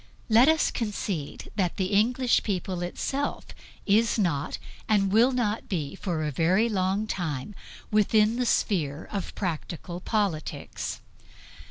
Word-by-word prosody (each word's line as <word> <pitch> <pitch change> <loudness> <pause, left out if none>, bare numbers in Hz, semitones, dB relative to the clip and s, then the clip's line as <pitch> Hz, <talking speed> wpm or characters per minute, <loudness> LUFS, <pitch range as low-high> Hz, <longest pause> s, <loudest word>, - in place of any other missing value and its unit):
Let 230 +4 +6
us 320 0 +3
concede 200 -8 -4
that 180 -4 0
the 190 +1 -1
English 245 +4 +3
people 185 -3 -2
itself 270 +10 -2 0.4
is 215 +3 +3
not 165 -8 0 0.3
and 195 -3 +3
will 230 +5 +5
not 230 -4 -1
be 155 -8 -2
for 175 -5 -3
a 150 - -1
very 180 - +3
long 195 0 0
time 160 -5 -3 0.4
within 215 +1 +3
the 250 -1 0
sphere 160 -9 0
of 200 -3 -4
practical 175 -1 -4
politics. 195 -6 -2
200 Hz, 130 wpm, -27 LUFS, 175-220 Hz, 0.4 s, Let